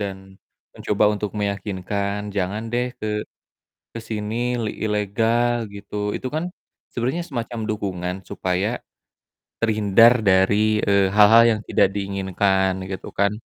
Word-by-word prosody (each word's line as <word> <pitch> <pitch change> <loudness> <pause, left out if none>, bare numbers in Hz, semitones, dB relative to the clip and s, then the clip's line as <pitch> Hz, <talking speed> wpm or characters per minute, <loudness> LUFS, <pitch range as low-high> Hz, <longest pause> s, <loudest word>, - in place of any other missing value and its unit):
dan 100 -2 -3 0.6
mencoba - - 0
untuk 105 0 -3
meyakinkan, 100 0 -2 0.2
"Jangan 100 +3 -1
deh 125 +1 +1
ke 110 - -5 0.9
ke 115 - -6
sini, 105 -1 -3 0.3
li 105 - -1
ilegal." 115 +3 0
Gitu. 100 +1 -11 0.2
Itu 130 - -4
kan 160 +2 -1 0.5
sebenernya 130 +8 -1
semacam 120 -4 -4
dukungan 90 -4 -3 0.2
supaya 95 +3 -1 0.9
terhindar 110 +1 +5 0.2
dari, 105 +3 +3
eee, 100 -1 +3
hal-hal 110 +3 +7
yang 110 - -1
tidak - - +4
diinginkan, 95 -1 0 0.2
gitu 95 - -6
kan. 100 0 +3
105 Hz, 120 wpm, -22 LUFS, 100-110 Hz, 0.9 s, hal-hal